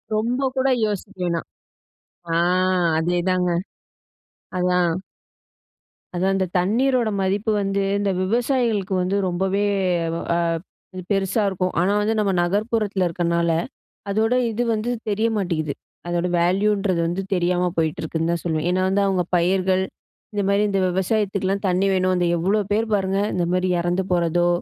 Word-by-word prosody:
ரொம்ப 235 +4 0 0.2
கூட 265 +1 +2 0.2
யோசிக்க 205 -1 -4
வேணாம். 170 -1 -1 0.9
அ. - - +2 0.7
அதேதாங்க. 180 +1 +1 1.1
அதான். 180 -1 +2 1.3
அதான் 190 +2 +1
இந்த 190 - +1
தண்ணீரோட 235 +4 +2
மதிப்பு 200 +4 0
வந்து 195 0 0 0.2
இந்த 200 -1 0
விவசாயிகளுக்கு 230 -2 0
வந்து 190 +3 0
ரொம்பவே 190 +3 0 0.5
வ - - -2 0.8
அது 185 - -6
பெருசா 195 +2 +1
இருக்கும். 185 -1 -1
ஆனா 185 +3 +2
வந்து 220 +2 +1
நம்ம 200 -2 +1
நகர்ப்புறத்துல 200 +1 0
இருக்கனால, 170 0 0 0.6
அதோட 220 +4 +1 0.2
இது 240 +3 -1
வந்து 220 +2 -2 0.2
தெரிய 215 +3 +1
மாட்டேங்குது. 160 -6 -1 0.3
அதோட 175 +1 0
வேல்யூன்றது 195 +1 +1
வந்து 175 +3 -2
தெரியாம 180 0 +1
போயிட்டிருக்குன்னு 160 0 -1
தான் 170 - -1
சொல்லுவேன். 160 -1 -1
ஏன்னா 185 +1 +1
வந்து 195 +1 +2
அவங்க 185 -2 +1
பயிர்கள் 185 +1 +2 0.5
இந்த 205 -1 0
மாதிரி 200 +1 +3
இந்த 195 -1 +1
விவசாயத்துக்குலாம் 195 +1 0
தண்ணி 185 +2 +2
வேணும். 185 0 +2
அந்த 175 - +1
எவ்ளோ 195 +6 +1
பேர் 220 +2 +1
பாருங்க, 195 -1 +1
இந்த 175 - 0
மாதிரி 185 0 +1
இறந்து 175 +2 0
போறதோ 175 0 +2
190 Hz, 135 wpm, -22 LUFS, 175-205 Hz, 1.3 s, மாதிரி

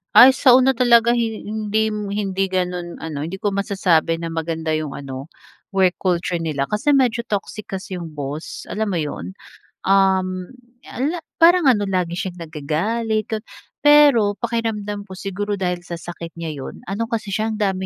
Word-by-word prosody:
Ay, 255 - +11
sa 260 -1 +5
una 260 0 +5
talaga 235 -2 +5
hi 225 -2 -1
hindim 215 0 -1
hindi 195 -2 0
ganun 180 -2 -3
ano, 155 -2 -4
hindi 190 +4 -6
ko 205 - +1
masasabi 180 -5 +1
na 165 - -3
maganda 165 0 -3
yung 155 -2 -1
ano, 135 -1 -7 0.5
work 185 -2 +3
culture 180 -1 0
nila. 150 -4 -2
Kasi 210 +8 +2
medyo 245 -4 +2
toxic 210 0 -4
kasi 190 -1 -5
yung 165 -3 -7
boss, 145 +2 -6
alam 215 -2 -2
mo 170 - 0
yun? 150 +5 -5 0.5
Uhm, 190 -1 +2 0.4
ala 305 +7 -2 0.2
parang 335 -3 +6
ano 210 -5 +3
lagi 180 -3 -1
siyang 180 -1 -5
nagagalit 200 +9 -2
ga 220 - -1 0.5
pero 285 -8 +6
pakiramdam 215 -3 -2
ko, 190 - -10
siguro 200 +2 -3
dahil 180 -1 -2
sa 175 - -7
sakit 170 0 -7
niya 165 -3 -5
yun. 135 - -8
Ano 205 +4 -1
kasi 225 -2 -3
siya, 220 +3 -1
ang 215 - -5
dami 190 -2 0
195 Hz, 170 wpm, -21 LUFS, 170-220 Hz, 0.5 s, Ay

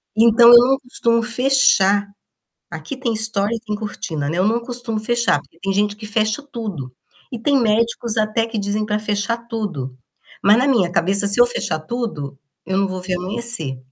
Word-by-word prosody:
Então 230 +1 +6
eu 240 - +11
não 265 +2 +2
costumo 235 -3 0
fechar. 240 -6 +3 0.6
Aqui 275 - -7
tem 255 -3 -2
estore 220 0 -1
e - - -5
tem 215 -2 -5
cortina, 165 -9 -4
né, 170 - -3
eu 185 - +2
não 230 +2 +1
costumo 240 -2 -3
fechar. 235 -8 +1
Porque 165 - -27
tem 195 +1 -2
gente 205 +1 0
que 215 0 -10
fecha 215 +4 0
tudo. 215 - -7 0.4
E 240 - -4
tem 280 +4 +2
médicos 230 +1 0
até 215 +1 0
que 225 -1 -5
dizem 205 +1 -2
para 210 0 -1
fechar 210 +2 -2
tudo. 180 - -5 0.5
Mas 205 +2 +6
na 255 +3 +2
minha 205 -10 +2
cabeça 195 +4 +1
se 200 +4 +1
eu 245 - +8
fechar 170 -9 -3
tudo, 155 - -5 0.3
eu 190 0 -1
não 195 0 +2
vou 185 -1 -5
ver 185 0 -2
amanhecer. 185 - -4
215 Hz, 190 wpm, -20 LUFS, 195-235 Hz, 0.6 s, eu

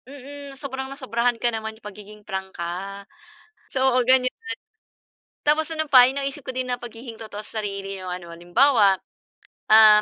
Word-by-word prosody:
Mm. 280 0 -10
Sobrang 265 -1 -5
nasobrahan 245 -3 0
ka 240 0 0
naman 220 0 -4
yung 220 - -24
pagiging 210 +1 -10
prangka. 190 0 -5 0.7
So, 265 -1 +2
oo, 255 - +4
ganyan. 255 0 +4 1.1
Tapos 305 +2 +3
ano 315 -1 -1
pa 255 -3 +8
yung 270 - -5
naisip 275 +1 -4
ko - - -8
din 255 0 -2
na 245 -1 -2
pagiging 235 0 -8
totoo 215 -2 -7
sa 220 - -3
sarili 195 -1 -4
yung 185 - -6
ano, 175 -2 -6
halimbawa, 200 +4 +4 0.7
um, 215 -1 +9
235 Hz, 160 wpm, -24 LUFS, 200-265 Hz, 1.1 s, um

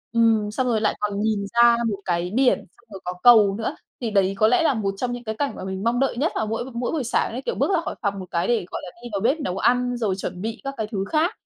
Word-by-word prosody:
ừm, 225 -2 +3
xong 255 +4 -1
rồi 225 -3 +1
lại 215 - +1
còn 205 -1 -2
nhìn 210 -2 0
ra 235 0 +6
một 200 - -2
cái 175 0 -1
biển, 260 -1 +4
xong 240 - -21
rồi 195 - -8
có 180 - -2
cầu 215 -5 +7
nữa. 225 - -3 0.3
Thì 230 -3 -2
đấy 195 -1 +2
có 215 - +4
lẽ 250 +8 +3
là 290 - +3
một 200 -4 -1
trong 245 +2 -2
những 245 0 -5
cái 220 -1 -4
cảnh 285 +2 -2
mà - - -7
mình 190 +1 -4
mong 240 +2 +1
đợi 270 -3 0
nhất 300 +6 +1
vào 220 - -1
mỗi 225 +2 -2
b 255 -1 -10
mỗi 240 +1 -2
buổi 310 -5 -1
sáng 235 - 0
ấy, 250 - -5
kiểu, 480 - -3
bước - - +1
ra 340 - +2
khỏi - - -5
phòng 200 -2 -1
một 185 - -6
cái 170 - 0
để, 235 -6 +1
gọi - - -4
là, - - -7
đi 240 - -7
vào 200 - -1
bếp 265 +8 +2
nấu 195 -11 -3
ăn, 245 +2 +2
rồi 210 -5 0
chuẩn 180 -1 -5
bị 220 +2 -4
các 275 0 -4
cái 220 -2 -2
thứ 195 -2 -2
khác, 330 +6 +2
225 Hz, 310 wpm, -23 LUFS, 200-245 Hz, 0.3 s, cầu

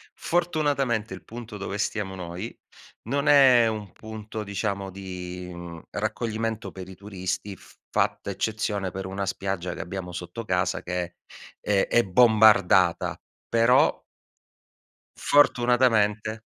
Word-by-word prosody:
fortunatamente 145 - 0
il 95 - -9
punto 115 -2 -9
dove 100 0 -4
stiamo 105 -2 -2
noi 90 +5 -6 0.5
non 140 +2 0
è 130 -5 +7
un 105 -4 -4
punto 110 0 -7
diciamo 100 -1 -3
di, 90 -1 -7
mhmm, 85 -1 -8
raccoglimento 115 -1 -3
per 95 -1 -9
i 95 - -10
turisti, 95 0 -4
f - - -18 0.2
fatta - - 0
eccezione 105 -3 -2
per 95 +1 -5
una 95 +1 -3
spiaggia 95 -2 -3
che - - -6
abbiamo 90 -1 -6
sotto 90 +6 -6
casa 90 -1 0
che 90 -1 -3 0.4
è 100 -2 +1
è 120 - +4
bombardata, 105 -4 +4 0.3
però 115 +3 +4 1.2
fortunatamente 115 -5 +3
105 Hz, 120 wpm, -26 LUFS, 95-115 Hz, 1.2 s, è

